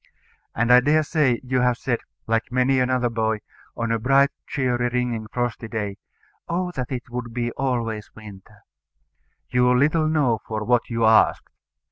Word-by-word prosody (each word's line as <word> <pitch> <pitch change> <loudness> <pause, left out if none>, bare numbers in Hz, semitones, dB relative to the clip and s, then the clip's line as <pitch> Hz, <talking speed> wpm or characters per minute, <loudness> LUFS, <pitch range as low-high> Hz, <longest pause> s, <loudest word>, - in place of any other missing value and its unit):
And 120 +2 +3
I 125 - +9
dare 150 +4 +3
say 145 -6 +1
you 130 0 0
have 125 -1 +2
said, 120 -1 -1 0.3
like 115 +1 -1
many 130 +1 +2
another 125 -1 +1
boy, 110 -2 -1 0.4
on 115 0 -1
a 115 - +1
bright 135 +4 +3 0.2
cheery 125 -3 0
ringing 120 -3 -2
frosty 120 0 -3
day, 105 -3 -4 0.5
"Oh, 180 +1 -1
that 130 -6 -5
it 125 -2 -5
would 120 -1 -5
be 120 -1 -1
always 115 -5 -2
winter!" 105 -1 -13 0.9
You 125 0 +3
little 155 +3 +2
knew 140 -8 +1
for 110 -1 -3
what 120 +2 +1
you 115 -1 0
asked. 110 0 +3
120 Hz, 160 wpm, -23 LUFS, 115-130 Hz, 0.9 s, I